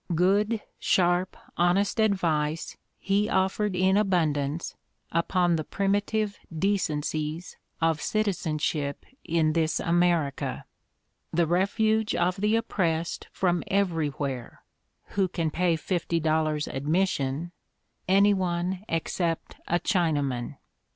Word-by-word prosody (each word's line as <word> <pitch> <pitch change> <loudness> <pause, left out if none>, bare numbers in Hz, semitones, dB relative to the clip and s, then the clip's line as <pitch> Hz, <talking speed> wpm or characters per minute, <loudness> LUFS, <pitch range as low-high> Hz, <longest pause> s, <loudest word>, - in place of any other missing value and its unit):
Good, 205 +6 +2 0.2
sharp, 180 0 +2 0.2
honest 185 +5 +2
advice 165 -7 +1 0.2
he 200 +2 +1
offered 190 +1 +1
in 190 +2 +3
abundance 160 -6 0 0.4
upon 170 +1 +2
the 155 - -2
primi 195 +4 +1
i - - 0
tive 210 0 -2
decencies 160 -3 -1 0.3
of 165 -2 +2
citizenship 155 -8 -1 0.2
in 160 -2 +1
this 160 -1 +1
America, 170 -4 +1 0.7
"the 170 +1 +2
refuge 215 +5 +1
of 180 +2 +1
the 210 +3 +2
oppressed 170 -7 -1
from 175 -2 0
everywhere 150 -9 -1 0.5
(who 195 -2 +1
can 165 -3 -2
pay 175 +1 +2
fifty 170 0 -1
dollars 155 -1 +1
admission) 150 0 -1 0.3
— - - -50 0.3
any 200 +2 +5
one 180 0 -1
except 165 0 -2
a 175 - +2
Chinaman." 145 - 0
175 Hz, 110 wpm, -27 LUFS, 155-195 Hz, 0.7 s, any